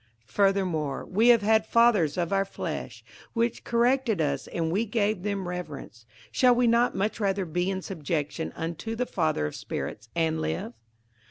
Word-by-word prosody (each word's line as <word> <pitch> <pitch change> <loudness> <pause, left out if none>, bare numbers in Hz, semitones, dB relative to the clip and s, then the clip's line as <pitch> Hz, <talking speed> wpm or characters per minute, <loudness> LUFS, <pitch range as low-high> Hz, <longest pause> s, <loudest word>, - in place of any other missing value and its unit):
58:012:009 - - -25
Furthermore 185 -8 +1
we 215 +6 +3
have 235 -2 +7
had 220 +1 +4
fathers 215 -11 +4
of 175 +1 -1
our 195 0 +3
flesh 195 - -6 0.3
which 235 0 0
corrected 240 -3 +2
us, 140 -3 -1
and 165 -1 -2
we 200 +6 +1
gave 215 -3 0
them 200 -2 -2
reverence: 150 -10 -7 0.2
shall 250 -1 +4
we 245 0 +3
not 235 +1 +3
much 205 +4 -1
rather 195 -2 0
be 175 +3 -1
in 190 -1 -3
subjection 160 -2 -3
unto 170 +8 -4
the 250 +2 -1
Father 155 - 0
of 75 - -4
spirits, 110 +2 -5
and 160 -1 +1
live? 80 +9 -3
190 Hz, 170 wpm, -27 LUFS, 160-225 Hz, 0.3 s, have